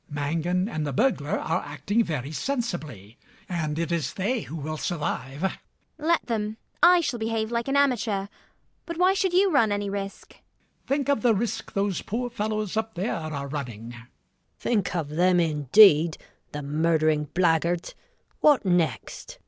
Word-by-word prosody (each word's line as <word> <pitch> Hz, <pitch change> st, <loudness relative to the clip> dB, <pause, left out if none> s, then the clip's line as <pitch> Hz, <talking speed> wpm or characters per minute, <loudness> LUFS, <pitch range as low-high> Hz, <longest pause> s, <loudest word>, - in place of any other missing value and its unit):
Mangan 165 Hz, +6 st, -1 dB
and 155 Hz, -9 st, -3 dB
the 140 Hz, -, -3 dB
burglar 150 Hz, -, +1 dB
are 165 Hz, +3 st, -1 dB
acting 150 Hz, -, 0 dB
very 150 Hz, -, -4 dB
sensibly; 155 Hz, -, -4 dB, 0.3 s
and 155 Hz, -4 st, -2 dB
it 170 Hz, +1 st, -2 dB
is 170 Hz, -3 st, -1 dB
they 220 Hz, +5 st, -1 dB
who 160 Hz, -, -8 dB
will 155 Hz, 0 st, -4 dB
survive. 150 Hz, -3 st, -3 dB
ELLIE. 190 Hz, -, +1 dB, 0.5 s
Let 330 Hz, +2 st, +1 dB
them. 215 Hz, -2 st, -2 dB, 0.2 s
I 350 Hz, 0 st, +7 dB
shall 250 Hz, -7 st, -2 dB
behave 220 Hz, 0 st, -2 dB
like 235 Hz, +1 st, -1 dB
an 275 Hz, +1 st, +1 dB
amateur. 230 Hz, -8 st, +1 dB, 0.6 s
But 335 Hz, -1 st, -5 dB
why 365 Hz, +2 st, +4 dB
should 385 Hz, -1 st, +1 dB
you 375 Hz, +2 st, +4 dB
run 230 Hz, -8 st, +3 dB
any 205 Hz, -1 st, -1 dB
risk? 195 Hz, 0 st, -5 dB
MAZZINI. -, -, -22 dB, 0.4 s
Think 280 Hz, 0 st, 0 dB
of 280 Hz, -6 st, +2 dB
the 230 Hz, -1 st, +4 dB
risk 225 Hz, +2 st, -3 dB
those 195 Hz, -2 st, 0 dB
poor 245 Hz, +3 st, -3 dB
fellows 215 Hz, -2 st, -2 dB
up 220 Hz, 0 st, -2 dB
there 185 Hz, +6 st, -1 dB
are 155 Hz, -4 st, -4 dB
running! 120 Hz, -6 st, -6 dB
NURSE -, -, -9 dB
GUINNESS. 120 Hz, +1 st, -14 dB, 0.5 s
Think 205 Hz, -7 st, -1 dB
of 160 Hz, -4 st, -2 dB
them, 175 Hz, +4 st, +3 dB
indeed, 160 Hz, -, +5 dB, 0.3 s
the 150 Hz, 0 st, -5 dB
murdering 155 Hz, +1 st, +1 dB
blackguards! 170 Hz, -1 st, +1 dB, 0.5 s
What 295 Hz, -7 st, +4 dB
next? 180 Hz, -, -1 dB
185 Hz, 165 wpm, -26 LUFS, 155-230 Hz, 0.6 s, I